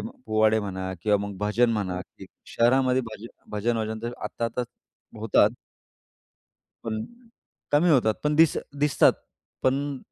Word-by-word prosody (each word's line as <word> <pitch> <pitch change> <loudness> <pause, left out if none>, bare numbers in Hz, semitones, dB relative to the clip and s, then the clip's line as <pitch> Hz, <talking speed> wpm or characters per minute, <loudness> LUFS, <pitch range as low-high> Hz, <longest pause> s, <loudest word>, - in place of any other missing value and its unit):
म्हण 250 +4 -9
पोवाडे 110 0 +3
म्हणा 95 -2 -4
किंवा 105 -1 +3
मग 100 -1 -7
भजन 105 +3 +2
म्हणा 95 -5 -2
की - - -13 0.2
शहरामध्ये 130 +2 +2
भज 110 +1 -9 0.2
भजन 110 +3 -1
वजन 110 0 -3
तर 120 +1 -3
आत्ता 115 - -3
आता 115 +2 -2 0.6
होतात. 110 0 +3 1.3
पण 110 -1 -3 0.7
कमी 155 +5 +4
होतात, 120 -8 +4
पण 150 0 +1
दिस 160 -1 +5 0.2
दिसतात. 145 -1 +4 0.5
पण 140 +1 0
115 Hz, 135 wpm, -25 LUFS, 105-130 Hz, 1.3 s, दिस